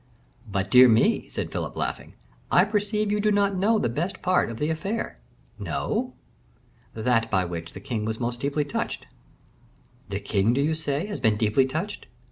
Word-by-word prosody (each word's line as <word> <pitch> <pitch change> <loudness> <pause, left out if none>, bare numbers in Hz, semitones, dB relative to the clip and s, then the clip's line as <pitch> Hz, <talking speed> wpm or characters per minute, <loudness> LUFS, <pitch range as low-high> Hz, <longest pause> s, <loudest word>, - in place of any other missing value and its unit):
"But, 95 0 -2
dear 125 0 +9
me," 115 0 +3
said - - -4
Philip, - - -4
laughing, - - -4 0.4
"I 180 - +6
perceive 210 0 0
you 210 - +1
do 210 0 +2
not 200 -1 +2
know 210 +4 +3
the 210 - +1
best 160 - -3
part 180 -6 +2
of 115 - -6
the 150 +4 0
affair." 195 - -3 0.4
"No!" - - -2 0.8
"That 115 0 +1
by 95 -3 +1
which 85 -1 -6
the - - -8
king 110 0 -3
was 110 0 -3
most 120 0 -2
deeply 145 +1 0
touched." 145 - -3 1.0
"The 100 0 -2
king, 100 +2 +1
do 140 - +2
you 155 +3 +1
say, 155 +1 -2
has 205 -1 -5
been 110 -1 +2
deeply 110 +5 +3
touched?" 170 +10 -4
140 Hz, 180 wpm, -25 LUFS, -, 1.0 s, dear